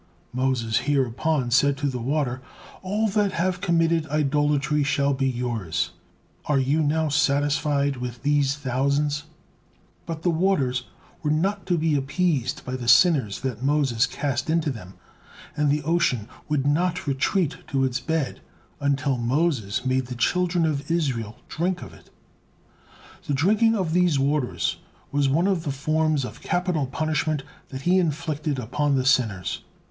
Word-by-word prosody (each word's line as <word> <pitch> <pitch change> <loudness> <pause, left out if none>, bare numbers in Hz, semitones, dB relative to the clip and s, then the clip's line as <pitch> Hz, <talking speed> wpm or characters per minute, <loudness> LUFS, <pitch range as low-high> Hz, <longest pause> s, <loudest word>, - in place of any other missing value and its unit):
Moses 125 -3 0
hereupon 135 0 +1
said 140 +2 +3
to 145 - -3
the 125 -3 -3
water" 130 -1 -1 0.4
"All 210 +4 0
that 205 -1 +1
have 185 +2 -1
committed 165 -3 +2
idolatry 145 0 +1
shall 140 0 +1
be 135 0 0
yours. 120 -9 -2 0.5
Are 150 - +2
you 135 +4 +2
now 155 +1 +1
satisfied 145 -1 +1
with 125 0 -6
these 145 -1 +2
thousands?" 145 +2 0 0.8
But 160 -1 -5
the 175 - +3
waters 145 -8 +1 0.4
were 150 - -1
not 190 +6 0
to 175 -2 +2
be 160 -1 +1
appeased 140 -2 0
by 125 - -3
the 120 -2 -6
sinners 130 - +4
that 125 -4 -3
Moses 135 -3 +2
cast 140 0 -2
into 160 -2 +1
them, 95 -6 -9 0.6
and 150 -1 +1
the 150 +1 +1
ocean 150 -9 +1 0.2
would 145 -3 0
not 175 +5 +1
retreat 145 +4 0
to 135 -1 0
its 125 -1 0
bed 155 +2 -2 0.4
until 140 -2 0
Moses 125 -3 0
made 130 -1 +1
the 125 - -6
children 175 +6 +1
of 145 -2 -2
Israel 130 -10 -1
drink 175 +2 -2
of - - -11
it. - - -18 1.2
The 145 - +1
drinking 215 +9 +3
of 180 -6 -1
these 175 -4 +3
waters 140 -1 0 0.3
was 140 -1 +2
one 160 +6 +2
of 195 -4 +1
the 145 - -2
forms 155 +1 0
of - - -9
capital 175 -6 0
punishment 155 0 -1 0.3
that 130 0 -6
he 185 +2 +4
inflicted 155 -3 -1
upon 140 +4 0
the 130 -1 0
sinners. 110 -9 +1
145 Hz, 150 wpm, -24 LUFS, 130-160 Hz, 1.2 s, sinners